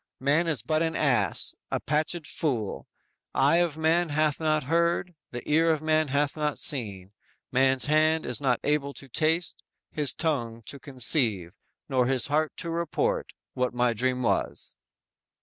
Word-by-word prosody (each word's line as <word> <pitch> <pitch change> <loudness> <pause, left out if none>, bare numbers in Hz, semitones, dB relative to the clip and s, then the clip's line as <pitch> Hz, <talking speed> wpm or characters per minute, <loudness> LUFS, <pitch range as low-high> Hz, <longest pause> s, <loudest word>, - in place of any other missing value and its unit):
Man 145 +6 +1
is 145 -9 +3
but 155 +5 0
an 165 0 -1
ass, 120 - +2 0.2
a - - -1
patched 155 +2 -1
fool. 125 - -3 0.5
Eye 145 +5 +4
of 170 -3 0
man 165 +2 +2
hath 150 0 +1
not 155 -1 +1
heard, 170 +4 0 0.2
the 120 - -8
ear 165 +2 +3
of 155 -1 0
man 155 0 +2
hath 140 +1 0
not 150 -2 -2
seen, 100 -9 0 0.4
man's 130 -1 +2
hand 155 +1 +2
is 125 +3 -3
not 130 -4 +1
able 140 -1 -1
to 135 - -10
taste, 160 +6 -1 0.3
his 150 -4 +1
tongue 120 -8 -2
to 140 - -7
conceive, 120 - +1 0.4
nor 130 -3 +1
his 130 -2 +1
heart 155 +2 -1
to 170 - -3
report, 450 - -1 0.3
what 125 -1 -2
my 120 -1 +2
dream 125 +2 -1
was!" - - -2
150 Hz, 160 wpm, -26 LUFS, 125-160 Hz, 0.5 s, Eye